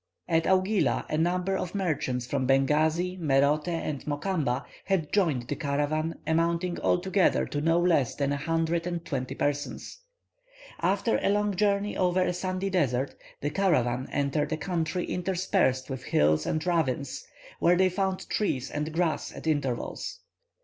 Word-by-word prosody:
At 165 -1 +2
Augila 190 +2 +2
a - - +1
number 180 +3 +1
of 185 0 -3
merchants 145 -10 -1
from 130 0 -1
Bengasi, 155 +7 +2
Merote, 145 0 +2
and 165 -5 -3
Mokamba 145 -4 -1 0.2
had 185 -6 0
joined 155 - +1
the - - -2
caravan, 155 +2 -1
amounting 170 +2 0
altogether 190 +1 +2
to 145 - -3
no 165 +2 +3
less 165 -8 +2
than 140 -1 0
a - - +1
hundred 165 +3 0
and 170 -1 -4
twenty 130 -4 -3
persons. 145 - -3 0.8
After - - +1
a - - +2
long 205 0 +1
journey 205 +1 +1
over 185 0 +2
a 180 - 0
sandy 185 +2 -2
desert, 135 -7 +1 0.3
the 145 - -1
caravan 130 -10 +1
entered 145 +2 0
a 155 - 0
country 165 +2 -2
interspersed 175 -8 0
with 130 -2 -6
hills 75 +1 +2
and 155 +1 -1
ravines, 145 -6 0 0.4
where 175 - +4
they 185 +1 +4
found 190 0 -2
trees 135 - -1
and 150 +2 -3
grass 165 0 -1
at - - -10
intervals. 145 - -2
165 Hz, 150 wpm, -28 LUFS, 140-180 Hz, 0.8 s, where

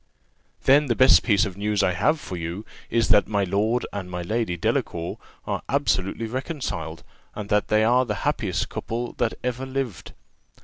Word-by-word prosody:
"Then, 145 +2 +5
the 120 - +1
first 80 -4 +7
piece 100 +2 +3
of 95 -3 -5
news 105 0 +1
I 95 - +3
have 150 - +2
for 95 - -6
you 85 +4 -5 0.2
is, 115 0 +1
that 100 - +5
my 100 -2 +1
Lord 105 +6 +1
and 95 -3 -5
my 90 -1 -4
Lady 105 -2 -1
Delacour 85 0 -1 0.3
are - - -2
absolutely 115 -6 0
reconciled; 115 - -4 0.3
and 105 -1 -6
that 105 -1 +2
they 110 0 +3
are 125 +3 +4
the 105 -4 -2
happiest - - 0
couple 120 +2 -4
that 115 -2 +1
ever 125 +1 -2
lived." 130 -6 -4
105 Hz, 175 wpm, -24 LUFS, 95-120 Hz, 0.3 s, first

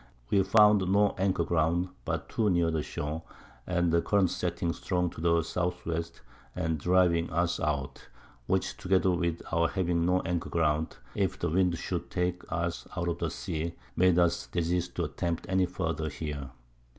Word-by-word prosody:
We 100 - +5
found 105 -1 +5
no 100 +1 +4
Anchor 95 -3 +2
ground, 85 +2 +1 0.2
but - - -2
too 110 -2 +1
near 85 -2 +2
the 80 -1 0
Shore, 75 +2 -4 0.5
and 90 -1 +1
the 85 0 +3
Current 100 -2 +2
setting 85 -1 -1
strong 90 -2 -1
to 85 - -9
the 85 0 +3
S. 85 - -7
W. 85 -2 -1 0.5
and 80 -1 -1
driving 90 0 +3
us 85 +2 0
out; 70 -4 -2 0.4
which - - 0
together 95 0 +2
with 85 -2 -1
our 85 0 +3
having 85 -3 0
no 90 0 +3
Anchor 90 +1 -2
ground, 80 -1 0 0.2
if - - 0
the - - -1
Wind 90 0 +2
should - - -4
take 90 0 -1
us 85 +1 -2
out 85 0 0
of 85 - -3
the - - -1
Sea, 85 +2 -4 0.2
made 90 -1 +4
us 85 -1 +2
desist 90 +1 -1
to 85 - -1
attempt 85 +1 -2
any 95 -1 +2
farther 80 -3 -2
here. 75 -2 -5
85 Hz, 175 wpm, -29 LUFS, 80-90 Hz, 0.5 s, We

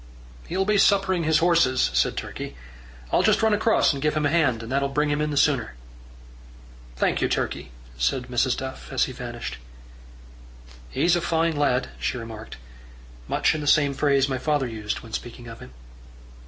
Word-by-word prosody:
"He'll 190 +2 -1
be 210 0 +2
suppering 195 -4 +3
his 160 0 +4
horses," 165 -8 +3
said - - +1
Turkey. - - -6 0.6
"I'll - - +3
just - - +3
run 220 -1 +4
across 220 -4 +3
and 140 - -5
give 150 +1 +1
him 150 -1 0
a 145 - +2
hand, 135 -9 +2
and 115 - -8
that'll 140 +1 +1
bring 150 +2 0
him 145 +1 0
in 150 - 0
the 145 - -3
sooner." 130 - +2 1.2
"Thank - - 0
you, - - +1
Turkey," - - -2 0.3
said 125 - +1
Mrs. 125 0 0
Duff 130 0 -7
as - - +2
he - - -2
vanished. - - -6 1.3
"He's 170 - +2
a 175 - 0
fine 165 -1 +1
lad," 135 -3 +1
she - - -2
remarked, 115 -2 -8 0.7
much - - +2
in 155 - -3
the 145 - -5
same 145 -1 +4
phrase 140 -1 +2
my 130 -2 -2
father 145 -1 0
used 110 -3 -4
when 115 -1 -13
speaking 120 +1 -6
of 115 0 -9
him. 65 - -12
140 Hz, 180 wpm, -24 LUFS, 125-160 Hz, 1.3 s, his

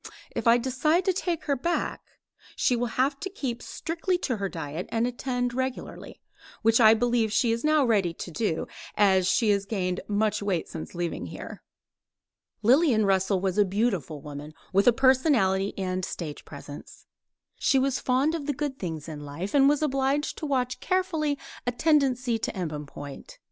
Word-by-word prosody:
If - - -1
I 230 +1 +7
decide 285 +8 +1
to 375 - +3
take 345 -3 -2
her 285 - +1
back, 340 +7 -2 0.5
she 250 - +2
will 240 +1 0
have 275 +2 +2
to 385 - -4
keep 265 -11 -4
strictly 340 +2 -2
to 250 -5 -1
her 200 -1 -2
diet 160 0 -5
and 230 0 +1
attend 245 0 -2
regularly, 260 0 -4 0.4
which 225 +2 +4
I 220 0 +8
believe 235 -1 +1
she 230 +2 +2
is 230 0 -1
now 305 -2 +4
ready 200 -7 +2
to 175 - -7
do, 165 -2 -1 0.3
as 190 -3 +4
she 220 0 +3
has 200 -1 0
gained 185 -4 -1
much 210 +1 0
weight 195 -5 -1
since 160 +2 -8
leaving 175 -1 -3
here. - - -8 1.0
Lillian 245 -2 +4
Russell 190 0 +2
was 190 +1 0
a - - +7
beautiful 190 - -1
woman, 150 +1 -8 0.2
with 195 +4 +3
a - - +9
personality 240 -7 +3
and 185 -1 -2
a - - -1
stage 155 -4 -6
presence. 145 0 -11 0.5
She 270 - +3
was 265 0 +1
fond 265 +5 +1
of 310 -4 -4
the 290 - +1
good 280 -1 -4
things 160 -4 -5
in 155 -2 -6
life, 145 +7 -5
and 275 -1 +6
was 295 +1 +1
obliged 275 +1 0
to 310 - -3
watch 255 -3 -1
carefully 325 -6 0 0.3
a - - +3
tendency 255 -4 +2
to - - -2
embonpoint. 150 - -6
235 Hz, 175 wpm, -27 LUFS, 190-275 Hz, 1.0 s, a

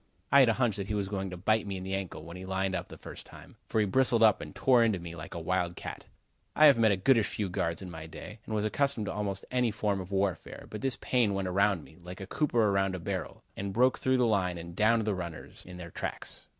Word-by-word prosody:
I 140 - +8
had 130 -4 +6
a - - +4
hunch 115 -4 +1
that 100 -1 -4
he 105 - -2
was 100 -2 -1
going 95 -1 -3
to 90 - -7
bite 110 +4 +1
me 100 -1 -3
in 95 - -6
the 95 +1 -4
ankle, 95 -2 -4
when 85 +1 -9
he 90 - -8
lined 95 0 -1
up 95 - -3
the - - -11
first - - -9
time, - - -14
for 110 - 0
he 105 - +3
bristled 120 +1 +3
up 110 -2 +5
and - - -8
tore 125 -3 +4
into 110 -4 +2
me 85 -1 -8
like 80 +1 -8
a - - -3
wild 85 +1 -1
cat. - - -7 0.5
I 155 - +7
have 140 -5 +7
met 110 -2 +5
a 100 - +2
goodish 115 +2 +4
few 105 -3 -3
guards 85 0 -2
in 90 - -7
my 80 -1 -8
day, 105 +6 -10
and 110 - -2
was 105 0 0
accustomed 140 0 0
to - - -3
almost 100 -2 -3
any 125 -2 +2
form 105 -2 -1
of 90 - -9
warfare, 95 -2 -2
but 105 - -6
this 135 -3 +1
Payne 115 -6 +2
went 95 -1 -1
around 100 -2 +2
me, 80 - -17
like 90 +1 -9
a 95 - -6
cooper 115 -2 +1
around 95 -1 +1
a - - -5
barrel, 90 -2 -5
and 100 0 -4
broke 125 +4 +3
through 130 0 +2
the 125 - +3
line 95 -5 +1
and 85 0 -8
downed 110 +2 +3
the 105 - +1
runners 85 -4 -7
in 90 -1 -9
their 85 -2 -8
tracks. - - -6
100 Hz, 275 wpm, -30 LUFS, 90-110 Hz, 0.5 s, I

